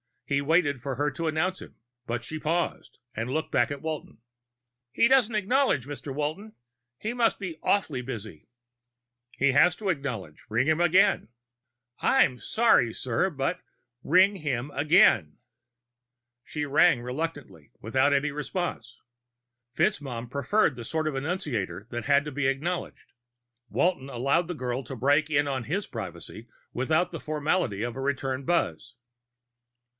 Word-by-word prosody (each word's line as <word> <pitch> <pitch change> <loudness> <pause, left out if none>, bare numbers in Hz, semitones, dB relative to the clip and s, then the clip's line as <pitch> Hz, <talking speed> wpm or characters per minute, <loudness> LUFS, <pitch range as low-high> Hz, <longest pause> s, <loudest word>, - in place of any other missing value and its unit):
He 140 0 0
waited 145 -3 +2
for 135 0 -3
her 145 +3 0
to 165 +4 -3
announce 165 +4 -1
him, - - -12 0.3
but 120 0 -2
she 155 +5 -5
paused 170 +3 -2
and 115 +3 -3
looked 155 +4 -2
back - - +2
at 140 -1 -5
Walton. 155 -7 -5 0.7
"He 230 - +3
doesn't 245 -4 +4
acknowledge, 215 - +2
Mr. 145 0 -7
Walton. 155 +9 -3 0.4
He 220 - -3
must 240 -2 +2
be 180 -5 -6
awfully 155 -10 +1
busy." 110 - -8 0.9
"He 140 0 +3
has 160 +6 +5
to 200 +1 -3
acknowledge. 125 - -4
Ring 115 +5 +1
him 160 +1 +2
again." 175 +2 +4 0.7
"I'm 125 -2 +3
sorry, 215 - +3
sir, 130 +9 0
but 155 +3 -2 0.3
" 120 +1 -51
"Ring 195 +2 +6
him 145 -4 -3
again." 150 - +4 1.1
She 150 -1 -3
rang, 145 -1 +4
reluctantly, 130 - -5
without 130 +6 +2
any 145 +1 +1
response. 145 -5 -4 0.7
FitzMaugham 125 -4 -1
preferred 140 - +1
the 120 - -7
sort 155 +4 -1
of - - -5
annunciator 135 - -3
that 120 0 -4
had 140 0 +4
to 150 - -6
be 140 0 0
acknowledged; 160 +7 -3 0.6
Walton 170 -7 0
allowed 140 +7 +1
the 175 - -4
girl 125 -2 -3
to 135 - -7
break 145 +5 +2
in 145 -1 +2
on 130 -4 -2
his 195 +6 -2
privacy 110 +1 -8 0.3
without 155 +7 +1
the 165 - -5
formality 150 - -1
of 120 +1 -4
a - - -4
return 135 -1 -2
buzz. 150 - -1
145 Hz, 150 wpm, -27 LUFS, 125-170 Hz, 1.1 s, Ring